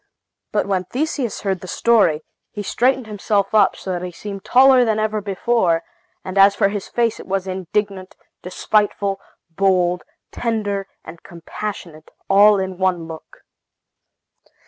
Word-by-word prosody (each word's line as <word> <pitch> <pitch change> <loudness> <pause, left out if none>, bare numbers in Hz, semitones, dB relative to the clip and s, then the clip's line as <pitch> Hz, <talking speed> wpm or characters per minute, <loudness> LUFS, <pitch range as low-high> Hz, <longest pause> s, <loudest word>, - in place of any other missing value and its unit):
But 210 - 0
when 190 -2 -1
Theseus 265 - -3
heard 190 -3 -2
the 185 - -9
story, 190 -9 +2 0.3
he 205 - -6
straightened 255 +4 +1
himself 205 -1 -1
up, 215 - +4
so 190 - -6
that 175 -1 -3
he 180 0 -5
seemed 195 +2 -8
taller 260 0 +5
than 220 -2 +1
ever 215 0 -1
before; 195 -4 0 0.4
and 185 +1 -2
as 200 +1 +6
for 200 - +2
his 205 -1 -5
face 235 -2 -1
it - - -11
was 190 0 -1
indignant, 190 +1 -3 0.3
despiteful, 200 +1 -1 0.3
bold, 180 -1 +1 0.3
tender, 205 -4 -2 0.2
and 165 +1 -11
compassionate, 170 -2 -8 0.2
all 205 +1 +6
in 190 -1 -4
one 180 -3 0
look. 160 -1 -12
195 Hz, 145 wpm, -20 LUFS, 185-215 Hz, 0.4 s, as